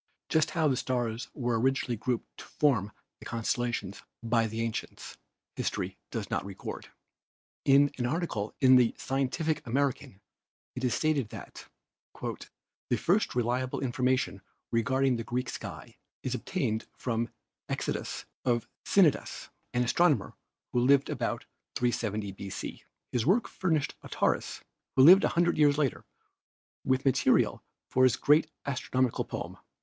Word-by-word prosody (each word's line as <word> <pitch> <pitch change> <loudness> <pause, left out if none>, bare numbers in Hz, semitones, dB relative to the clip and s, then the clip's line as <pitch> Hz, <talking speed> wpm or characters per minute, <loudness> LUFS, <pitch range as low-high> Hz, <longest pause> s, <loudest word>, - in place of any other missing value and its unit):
Just 160 -1 +3
how 160 -2 +4
the 135 - +2
stars 120 0 -2
were 120 -4 0
originally 130 0 +1
grouped 115 +2 -3
to - - -9
form 120 -9 +1 0.3
the - - -12
constellations 120 -3 -2 0.2
by 115 0 +2
the 110 +1 -4
ancients 115 -1 -5 0.4
history - - -3
does - - -4
not - - 0
record. 95 -1 -7 0.8
In 140 +1 +6
an 120 - +1
article 125 - -2
in 130 -2 +7
the 120 -2 +3
Scientific 140 +4 -1
American 130 -5 -1 0.5
it 125 - -6
is 125 - +2
stated 150 -7 +1
that - - -10 0.5
"the 120 - -5
first 180 - +1
reliable 125 +1 0
information 125 -5 0 0.3
regarding 130 +3 +2
the 115 - -3
Greek 125 +3 -2
sky - - -8 0.3
is - - -2
ob - - -5
tained 110 +1 -1
from 115 -1 -1 0.4
Eudoxus - - -3 0.2
of 120 -2 +1 0.2
Cnidus, - - +2 0.2
an 125 0 +1
astronomer 150 +5 +2 0.4
who 125 - +3
lived 140 +4 +4
about 120 -3 -2 0.3
370 110 -4 -1
b.c. 95 0 -7 0.3
His 120 +1 0
work 210 +7 +3
furnished 160 -6 0
Aratus, - - -1 0.3
who 130 - +6
lived 185 +7 +9
a - - -1
hundred 175 -2 +3
years 145 -1 +5
later, 140 -5 0 0.8
with 130 +1 +1
material 135 - +3 0.3
for 130 - +4
his 130 - +5
great 155 +2 +4 0.2
astronomi 130 -2 0
cal - - -1
poem. - - -6
125 Hz, 140 wpm, -29 LUFS, 115-140 Hz, 0.8 s, lived